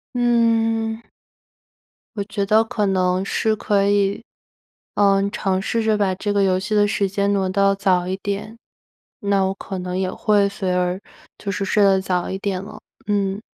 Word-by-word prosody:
嗯。 225 Hz, -2 st, +1 dB, 1.1 s
我 200 Hz, -, -1 dB
觉 205 Hz, -1 st, -3 dB
得 215 Hz, +2 st, +4 dB
可 215 Hz, -2 st, -1 dB
能 185 Hz, 0 st, +1 dB
是 220 Hz, +2 st, 0 dB
可 200 Hz, -2 st, +1 dB
以， 200 Hz, +2 st, +1 dB, 0.7 s
嗯， 200 Hz, -1 st, +3 dB
尝 190 Hz, -3 st, -1 dB
试 230 Hz, +3 st, -1 dB
着 215 Hz, -1 st, +1 dB
把 195 Hz, -2 st, +1 dB
这 205 Hz, +2 st, -2 dB
个 200 Hz, -1 st, +2 dB
游 185 Hz, -1 st, +2 dB
戏 190 Hz, +3 st, -5 dB
的 205 Hz, -1 st, +4 dB
时 200 Hz, -1 st, 0 dB
间 200 Hz, +1 st, 0 dB
挪 190 Hz, -2 st, +1 dB
到 195 Hz, +1 st, +2 dB
早 185 Hz, -3 st, +1 dB
一 185 Hz, -, -2 dB
点。 200 Hz, +3 st, -4 dB, 0.6 s
那 200 Hz, -1 st, +1 dB
我 190 Hz, 0 st, 0 dB
可 195 Hz, 0 st, -7 dB
能 180 Hz, 0 st, -4 dB
也 185 Hz, -1 st, -1 dB
会 205 Hz, -2 st, +2 dB
随 190 Hz, -2 st, -3 dB
而 180 Hz, +1 st, 0 dB, 0.4 s
就 200 Hz, -, -4 dB
是 200 Hz, 0 st, -2 dB
睡 205 Hz, +1 st, +2 dB
得 195 Hz, -1 st, +4 dB
早 180 Hz, -2 st, -2 dB
一 190 Hz, -, -3 dB
点 195 Hz, -2 st, -3 dB
了， 200 Hz, -, -10 dB, 0.3 s
嗯。 200 Hz, 0 st, 0 dB
200 Hz, 190 characters per minute, -21 LUFS, 190-210 Hz, 1.1 s, 得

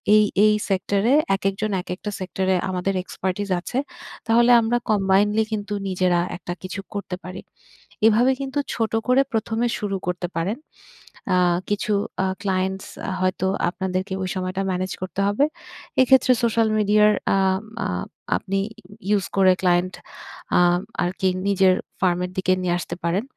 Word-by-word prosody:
এই, 215 Hz, -, +6 dB, 0.2 s
এই 215 Hz, -, +5 dB, 0.2 s
সেক্টরে 200 Hz, +5 st, +1 dB, 0.2 s
একেকজন, 195 Hz, +2 st, -2 dB
একেকটা 180 Hz, +4 st, -5 dB
সেক্টরে 190 Hz, 0 st, -1 dB
আমাদের 185 Hz, +1 st, -1 dB
expertise 190 Hz, +2 st, -3 dB
আছে। 240 Hz, -, -5 dB, 0.5 s
তাহলে 235 Hz, +2 st, +5 dB
আমরা 230 Hz, +2 st, +1 dB
combinedly 205 Hz, +2 st, +3 dB
কিন্তু 210 Hz, 0 st, -3 dB
নিজেরা 185 Hz, -2 st, +1 dB, 0.2 s
একটা 175 Hz, -1 st, -5 dB
কিছু 185 Hz, +2 st, -5 dB
করতে 200 Hz, -2 st, -4 dB
পারি।" 180 Hz, 0 st, -7 dB, 0.7 s
এভাবে 235 Hz, +4 st, +4 dB
কিন্তু 275 Hz, +1 st, -2 dB, 0.2 s
ছোট 225 Hz, -1 st, -1 dB, 0.2 s
করে 255 Hz, +2 st, +5 dB
প্রথমে 225 Hz, +1 st, 0 dB
শুরু 200 Hz, -2 st, -2 dB
করতে 180 Hz, 0 st, -2 dB
পারেন। 190 Hz, +8 st, -1 dB, 0.8 s
আ -, -, +3 dB, 0.3 s
কিছু 205 Hz, +1 st, -1 dB, 0.3 s
আ -, -, +1 dB, 0.2 s
ক্লায়েন্টস 190 Hz, 0 st, -1 dB, 0.3 s
হয়তো 185 Hz, 0 st, 0 dB, 0.2 s
আপনাদেরকে 190 Hz, +1 st, -3 dB
ওই 185 Hz, -, -3 dB
সময়টা 185 Hz, +1 st, -2 dB
মেনেজ 185 Hz, 0 st, -2 dB
করতে 185 Hz, +1 st, -3 dB
হবে। 205 Hz, +8 st, +3 dB, 0.6 s
এক্ষেত্রে 260 Hz, 0 st, +5 dB
সোশ্যাল 230 Hz, -1 st, +3 dB
মিডিয়ার 210 Hz, 0 st, +4 dB, 0.3 s
আম 190 Hz, 0 st, +2 dB, 0.2 s
আ -, -, +1 dB, 0.5 s
আপনি 195 Hz, 0 st, -2 dB
ই -, -, -9 dB, 0.4 s
ইউস 205 Hz, -2 st, +2 dB
করে 190 Hz, -1 st, +6 dB
ক্লায়েন্ট 180 Hz, 0 st, +2 dB, 0.7 s
আম 175 Hz, 0 st, +4 dB, 0.2 s
আরকি 185 Hz, +1 st, 0 dB, 0.2 s
নিজের 190 Hz, -2 st, +4 dB, 0.3 s
ফার্মের 180 Hz, -1 st, +1 dB
দিকে 185 Hz, 0 st, +2 dB
নিয়ে 180 Hz, -1 st, 0 dB
আসতে 175 Hz, -, -5 dB
পারেন। 175 Hz, +5 st, 0 dB
195 Hz, 140 wpm, -23 LUFS, 185-210 Hz, 0.8 s, এই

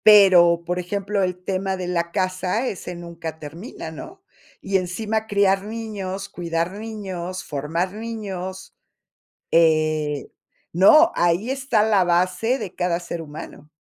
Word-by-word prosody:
Pero, 180 Hz, -5 st, +7 dB
por 180 Hz, +1 st, -1 dB
ejemplo, 200 Hz, +2 st, -2 dB
el 180 Hz, -1 st, 0 dB
tema 190 Hz, 0 st, -1 dB
de 180 Hz, -1 st, -4 dB
la 170 Hz, -1 st, -1 dB
casa, 185 Hz, +6 st, 0 dB
ese 180 Hz, -4 st, -5 dB
nunca 170 Hz, -2 st, -7 dB
termina, 160 Hz, -, -8 dB
¿no? 375 Hz, -, -10 dB, 0.4 s
Y 195 Hz, -, +1 dB
encima 215 Hz, +4 st, -2 dB
criar 195 Hz, -2 st, +3 dB
niños, 205 Hz, -3 st, -5 dB
cuidar 170 Hz, 0 st, -2 dB
niños, 190 Hz, -4 st, -5 dB
formar 160 Hz, +6 st, -2 dB
niños. 200 Hz, -4 st, -6 dB, 0.8 s
Eh 155 Hz, -3 st, +2 dB, 0.4 s
no, 305 Hz, -, +7 dB
ahí 175 Hz, +7 st, +2 dB
está 265 Hz, -5 st, +1 dB
la 210 Hz, -4 st, +4 dB
base 185 Hz, +8 st, +1 dB
de 190 Hz, -, -6 dB
cada 175 Hz, -1 st, 0 dB
ser 170 Hz, -1 st, -5 dB
humano. 150 Hz, -1 st, -10 dB
185 Hz, 130 wpm, -23 LUFS, 170-205 Hz, 0.8 s, Pero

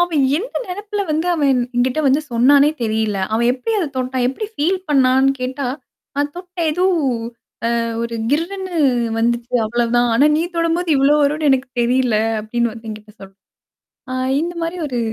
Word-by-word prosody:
அவன் 335 Hz, -5 st, +2 dB, 0.2 s
எந்த 455 Hz, +7 st, -6 dB
நெனப்புல 410 Hz, +2 st, -4 dB
வந்து 315 Hz, +3 st, 0 dB
அவன் 295 Hz, -4 st, +1 dB, 0.3 s
என்கிட்ட 250 Hz, +4 st, +1 dB
வந்து 275 Hz, +3 st, +3 dB
சொன்னானே 280 Hz, +5 st, +5 dB
தெரியல. 220 Hz, -2 st, 0 dB, 0.2 s
அவன் 235 Hz, +2 st, +2 dB
எப்டி 265 Hz, -, -3 dB
அத 350 Hz, -, 0 dB
தொட்டான், 255 Hz, 0 st, -1 dB
எப்டி 345 Hz, -, -4 dB
பீல் 360 Hz, +6 st, +1 dB
பண்ணானு 265 Hz, -1 st, +4 dB
கேட்டா, 260 Hz, +2 st, -3 dB, 0.5 s
நான் 290 Hz, 0 st, -1 dB
தொட்ட 360 Hz, 0 st, -11 dB
ஏதோ 355 Hz, +4 st, 0 dB, 1.2 s
ஒரு 235 Hz, 0 st, -4 dB, 0.2 s
கிர்னு 360 Hz, +4 st, -2 dB, 0.4 s
வந்துச்சு 235 Hz, +2 st, -1 dB
அவ்ளோ 240 Hz, +2 st, 0 dB
தான். 240 Hz, 0 st, +3 dB
ஆனா 275 Hz, +6 st, +5 dB
நீ 320 Hz, -, +1 dB
தொடும்போது 335 Hz, +1 st, 0 dB
இவ்ளோ 275 Hz, +2 st, +4 dB
வரும்னு 300 Hz, +1 st, +1 dB
எனக்கு 265 Hz, 0 st, +1 dB
தெரியல 245 Hz, -1 st, +2 dB, 0.2 s
அப்டின்னு 235 Hz, +2 st, -1 dB
வந்து 225 Hz, 0 st, -10 dB
எங்கிட்ட 215 Hz, 0 st, -10 dB
சொல்ற. 195 Hz, 0 st, -12 dB, 0.8 s
ஆ -, -, -3 dB, 0.3 s
இந்த 345 Hz, +2 st, -3 dB
மாரி 335 Hz, +2 st, -3 dB
ஒரு 250 Hz, -3 st, -3 dB
270 Hz, 160 wpm, -19 LUFS, 240-330 Hz, 1.2 s, சொன்னானே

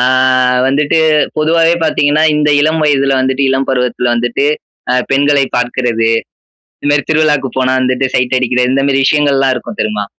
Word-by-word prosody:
அ -, -, +1 dB, 0.7 s
வந்துட்டு 145 Hz, +3 st, 0 dB, 0.4 s
பொதுவாவே 165 Hz, +2 st, +2 dB
பாத்தீங்கன்னா, 150 Hz, 0 st, +1 dB
இந்த 150 Hz, 0 st, +1 dB
இளம் 155 Hz, +1 st, 0 dB
வயதுல 140 Hz, -2 st, +1 dB
வந்துட்டு 130 Hz, +1 st, -1 dB
இளம் 135 Hz, 0 st, -1 dB
பருவத்துல 125 Hz, -1 st, -1 dB
வந்துட்டு, 120 Hz, +4 st, -1 dB, 0.5 s
அ -, -, +1 dB, 0.2 s
பெண்களை 140 Hz, 0 st, +2 dB
பாக்குறது, 120 Hz, -2 st, -1 dB, 0.7 s
இந்தமாரி 145 Hz, -1 st, +1 dB
திருவிழாக்கு 150 Hz, -4 st, +1 dB
போனா 130 Hz, 0 st, +1 dB
வந்துட்டு 130 Hz, +1 st, 0 dB
சைட் 125 Hz, 0 st, 0 dB
அடிக்கிறது 125 Hz, 0 st, 0 dB
இந்தமாரி 135 Hz, 0 st, +1 dB
விஷயங்கள்லாம் 140 Hz, -3 st, +1 dB
இருக்கும் 115 Hz, -, -8 dB
தெரியுமா? 105 Hz, -1 st, -3 dB
135 Hz, 140 wpm, -12 LUFS, 125-145 Hz, 0.7 s, பொதுவாவே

